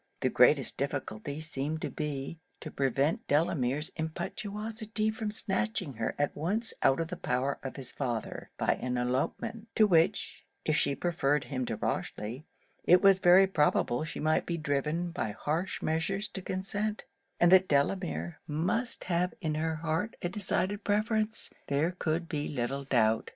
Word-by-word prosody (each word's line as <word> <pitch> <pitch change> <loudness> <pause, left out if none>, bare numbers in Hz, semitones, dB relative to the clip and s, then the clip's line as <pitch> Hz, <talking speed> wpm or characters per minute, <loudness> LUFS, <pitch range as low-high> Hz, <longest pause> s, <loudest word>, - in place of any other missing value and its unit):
The - - +2
greatest - - +4
difficulty 140 +7 -3
seemed 155 0 -3
to - - -2
be, 150 0 -4 0.2
to 155 - -7
prevent 140 - 0
Delamere's 145 -1 +1
impetuosity 215 +6 -3
from 220 -1 -3
snatching 210 - -1
her 115 - -2
at 145 - 0
once 205 +9 0
out 135 - +4
of 165 -1 -2
the 180 - -4
power 130 -2 -1
of 135 - -6
his 130 -3 -2
father, 120 -5 -4
by - - +2
an 125 0 -1
elopement; 175 - -2
to 215 - +6
which, 180 0 +2 0.2
if 155 - +2
she 140 -1 +2
preferred 150 -5 +1
him 130 -4 -3
to - - -2
Rochely, 120 +8 -3 0.4
it 180 +2 +5
was 195 -1 +7
very 185 +2 +7
probable 150 -7 +2
she 160 - -6
might 155 +1 +1
be 170 - -1
driven 150 +3 -1
by 115 - -3
harsh 160 - -2
measures 195 +6 0
to 190 - -6
consent; 200 +3 -3 0.3
and 175 0 +5
that 190 0 +7
Delamere 170 +3 0
must 180 +11 0
have 180 0 0
in 155 -1 -1
her 160 +1 -1
heart 165 +7 -2
a 175 - 0
decided 200 +1 +1
preference, 215 +1 0 0.2
there 145 +5 +1
could 170 -1 -2
be 150 -2 -2
little 135 +1 -3
doubt. 110 -4 +2
160 Hz, 160 wpm, -30 LUFS, 140-195 Hz, 0.4 s, was